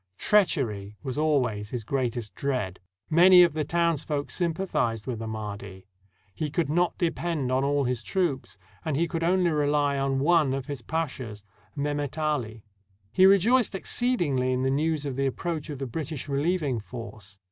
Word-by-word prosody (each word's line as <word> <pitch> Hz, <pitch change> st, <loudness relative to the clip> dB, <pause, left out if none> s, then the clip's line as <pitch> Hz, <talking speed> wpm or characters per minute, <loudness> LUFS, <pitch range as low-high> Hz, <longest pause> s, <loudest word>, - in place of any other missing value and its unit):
Treachery 115 Hz, -, +1 dB
was 130 Hz, -, -4 dB
always 125 Hz, -9 st, 0 dB
his 120 Hz, -1 st, -4 dB
greatest 120 Hz, -2 st, -2 dB
dread. 125 Hz, -10 st, -2 dB, 0.3 s
Many 180 Hz, +2 st, +7 dB
of 170 Hz, -3 st, +2 dB
the 155 Hz, 0 st, -1 dB
townsfolk 155 Hz, -2 st, -1 dB
sym 175 Hz, -2 st, +1 dB
pathized 115 Hz, -, -1 dB
with 125 Hz, -4 st, -4 dB
the 115 Hz, -, -5 dB
Mahdi; 100 Hz, -3 st, -6 dB, 0.5 s
he 150 Hz, +9 st, -3 dB
could 150 Hz, 0 st, -1 dB
not 175 Hz, +2 st, +1 dB
depend 165 Hz, -5 st, -1 dB
on 130 Hz, +1 st, +2 dB
all 140 Hz, 0 st, +1 dB
his 125 Hz, -2 st, -1 dB
troops, 135 Hz, -, -2 dB, 0.3 s
and 150 Hz, -3 st, -1 dB
he 170 Hz, +2 st, +1 dB
could 165 Hz, 0 st, -3 dB
only 180 Hz, 0 st, +2 dB
rely 145 Hz, -2 st, +1 dB
on 135 Hz, 0 st, 0 dB
one 150 Hz, -1 st, +3 dB
of 135 Hz, -1 st, -4 dB
his 145 Hz, -4 st, -6 dB
pashas, 130 Hz, -8 st, -4 dB, 0.3 s
Mehemet 145 Hz, -1 st, -2 dB
Ali. 125 Hz, -9 st, -2 dB, 0.5 s
He 185 Hz, -, +6 dB
rejoiced 205 Hz, +4 st, +4 dB
exceedingly 175 Hz, -, 0 dB
in 130 Hz, 0 st, 0 dB
the 130 Hz, -, +1 dB
news 150 Hz, +1 st, 0 dB
of 135 Hz, -2 st, -4 dB
the 135 Hz, 0 st, +1 dB
approach 155 Hz, +3 st, -3 dB
of 145 Hz, -, -5 dB
the 135 Hz, -, -4 dB
British 150 Hz, +2 st, -5 dB
relieving 145 Hz, -2 st, 0 dB
force. 110 Hz, -3 st, -9 dB
140 Hz, 170 wpm, -27 LUFS, 125-165 Hz, 0.5 s, Many